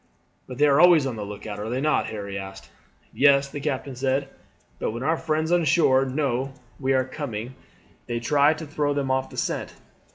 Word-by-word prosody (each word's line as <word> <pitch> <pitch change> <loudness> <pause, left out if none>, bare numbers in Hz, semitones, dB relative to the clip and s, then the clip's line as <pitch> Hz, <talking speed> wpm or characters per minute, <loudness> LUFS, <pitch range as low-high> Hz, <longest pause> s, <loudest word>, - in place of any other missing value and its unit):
"' - - -41
"But 125 - -8
they 145 - +4
are 140 0 +4
always 175 -5 +6
on 130 -3 -3
the 105 - -5
look 100 0 -8
out, 105 -2 -5
are 105 +2 -4
they 125 +2 -1
not?" 150 +2 +1
Harry 100 -2 -6
asked. 95 0 -8 0.4
"Yes," 140 0 +4
the 145 - -6
captain 140 -2 -3
said; 135 +2 -1 0.5
"but - - -1
when 120 +3 -5
our 160 +4 +2
friends 160 0 -1
on 175 -1 +3
shore 135 -3 +4
know 135 -1 -1 0.3
we 135 -1 0
are 130 -1 +2
coming 130 -4 -6 0.5
they 120 - -2
try 145 +5 +3
to 160 +1 -7
throw 145 -1 -1
them 135 -2 -1
off 130 0 0
the - - -12
scent. - - -3
135 Hz, 215 wpm, -24 LUFS, 120-150 Hz, 0.5 s, always